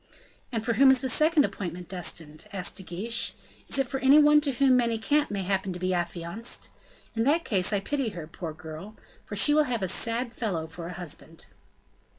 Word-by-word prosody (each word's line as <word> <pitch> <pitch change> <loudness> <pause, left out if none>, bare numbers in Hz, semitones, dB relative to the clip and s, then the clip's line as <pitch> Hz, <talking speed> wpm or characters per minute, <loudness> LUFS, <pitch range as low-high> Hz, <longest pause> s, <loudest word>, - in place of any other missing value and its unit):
"And 225 -2 -2
for 235 - +1
whom 270 +3 +6
is 265 -1 +5
the 260 - -1
second 305 +3 +4
appointment 180 -2 -6
destined?" 160 -4 -5
asked 190 -3 -2
De - - -2
Guiche; 200 +6 -2 0.3
"is - - +1
it 270 -1 +1
for 270 +2 -3
anyone 295 +2 +6
to 285 -2 0
whom 260 +1 +4
Manicamp 245 +5 +1
may 200 -2 -2
happen 190 0 -1
to 180 - -7
be 185 +1 0
affianced? 175 +5 -3 0.4
In 225 -1 0
that 315 +4 +2
case 190 -4 +1
I 200 -2 +1
pity 275 +2 -1
her, 175 -6 -7
poor 165 +1 -7
girl! 160 +6 -9 0.3
for 205 - -5
she 205 +9 +5
will 305 0 +4
have 235 -6 -2
a - - +1
sad 230 +5 -1
fellow 190 -9 -2
for 165 +1 -8
a 180 - -6
husband." 165 -1 -8
215 Hz, 200 wpm, -27 LUFS, 180-260 Hz, 0.4 s, whom